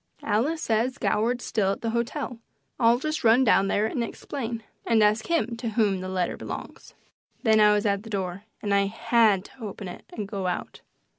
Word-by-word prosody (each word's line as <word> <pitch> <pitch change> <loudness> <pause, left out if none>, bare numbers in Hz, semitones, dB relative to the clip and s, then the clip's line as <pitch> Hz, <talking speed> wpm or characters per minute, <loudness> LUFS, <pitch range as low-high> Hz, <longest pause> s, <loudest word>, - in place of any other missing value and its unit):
Alice 290 +10 0
says 230 +3 0
Goward's 240 +3 0
still 195 -3 +1
at - - -9
the 230 - -1
hotel. 235 +1 -3 0.4
I'll 235 0 +5
just 310 +4 -3
run 230 +3 +6
down 195 -5 +4
there 205 +2 +1
and 235 +2 -1
explain, 230 -1 -5 0.2
and 225 -2 +3
ask 215 +1 +2
him 280 -9 0
to 230 0 -3
whom 210 -4 +1
that 185 - -5
letter 185 -2 -1
belongs." - - -8 0.5
Then 220 -2 +5
I 210 0 +7
was 210 0 +1
at 200 -1 +1
the 225 - -11
door, 195 -1 -3 0.2
and 205 -1 0
I 200 0 +3
HAD 225 -2 +2
to 260 - -16
open 205 -2 -6
it 175 - -9
and 210 -3 -5
go 195 -2 -3
out. 180 - -4
220 Hz, 200 wpm, -26 LUFS, 200-235 Hz, 0.5 s, I